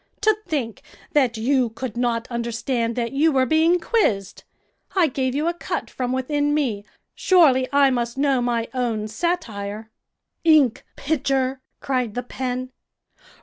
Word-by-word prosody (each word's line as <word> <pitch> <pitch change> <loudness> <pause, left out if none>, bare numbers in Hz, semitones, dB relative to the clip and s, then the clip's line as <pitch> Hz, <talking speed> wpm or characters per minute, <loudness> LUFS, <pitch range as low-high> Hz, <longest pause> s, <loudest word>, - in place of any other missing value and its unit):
To 435 -1 +4
think 265 - -3 0.3
that 255 -6 +2
you 250 +1 +1
could 225 0 -6
not 235 -1 -1
understand 235 0 -2
that 235 -1 -2
you 300 +4 +3
were 260 -2 +3
being 320 +6 +3
quizzed. 215 - 0 0.5
I 370 -3 +5
gave 260 -3 -1
you 300 +3 0
a 340 - +1
cut 345 - -4
from 250 -1 -3
within 290 +3 0
me. 230 -9 -1 0.3
Surely 275 -9 +4
I 280 -1 +4
must 240 0 -2
know 275 -2 +2
my 235 -1 -1
own 230 -4 -1
satire." 220 - -3 0.5
"Ink 300 -7 +4
pitcher!" 270 -3 -1 0.2
cried 250 -5 -1
the 245 - -2
pen. 255 0 -4
255 Hz, 145 wpm, -22 LUFS, 235-290 Hz, 0.5 s, I